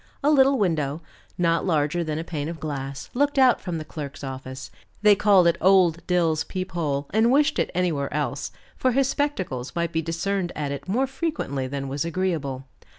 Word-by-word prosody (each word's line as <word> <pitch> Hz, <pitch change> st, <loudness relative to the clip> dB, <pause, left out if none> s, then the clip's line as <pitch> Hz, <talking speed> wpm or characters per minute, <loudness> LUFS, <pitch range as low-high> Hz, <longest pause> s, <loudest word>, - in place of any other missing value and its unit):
A 295 Hz, -, +4 dB
little 275 Hz, -1 st, +5 dB
window, 160 Hz, -, 0 dB, 0.3 s
not 170 Hz, -1 st, +2 dB
larger 160 Hz, -1 st, +1 dB
than 155 Hz, -2 st, -3 dB
a 160 Hz, -, -3 dB
pane 155 Hz, -3 st, -4 dB
of 165 Hz, -1 st, -6 dB
glass, 135 Hz, -2 st, -5 dB
looked 285 Hz, +3 st, +1 dB
out 260 Hz, -2 st, +5 dB
from 175 Hz, -3 st, -3 dB
the 155 Hz, -, -6 dB
clerk's 150 Hz, -1 st, -7 dB
office; 130 Hz, -1 st, -7 dB, 0.3 s
they 210 Hz, -1 st, +8 dB
called 200 Hz, -3 st, +5 dB
it 170 Hz, 0 st, +3 dB
old 180 Hz, -3 st, +4 dB
Dill's 165 Hz, -3 st, +2 dB
peep 185 Hz, 0 st, -5 dB
hole 145 Hz, -5 st, -1 dB
and 220 Hz, +3 st, +4 dB
wished 295 Hz, +3 st, +3 dB
it -, -, +1 dB
anywhere 165 Hz, -6 st, 0 dB
else, 150 Hz, +1 st, -2 dB, 0.2 s
for 255 Hz, -1 st, +1 dB
his 270 Hz, +1 st, +3 dB
spectacles 185 Hz, -, -2 dB
might 170 Hz, 0 st, -1 dB
be 160 Hz, -, 0 dB
discerned 175 Hz, +3 st, -2 dB
at 145 Hz, -2 st, -3 dB
it 140 Hz, -, -6 dB
more 240 Hz, +8 st, +1 dB
frequently 265 Hz, -, -3 dB
than 135 Hz, +1 st, -4 dB
was 140 Hz, +3 st, -2 dB
agreeable. 165 Hz, -7 st, -2 dB
170 Hz, 190 wpm, -24 LUFS, 145-200 Hz, 0.3 s, they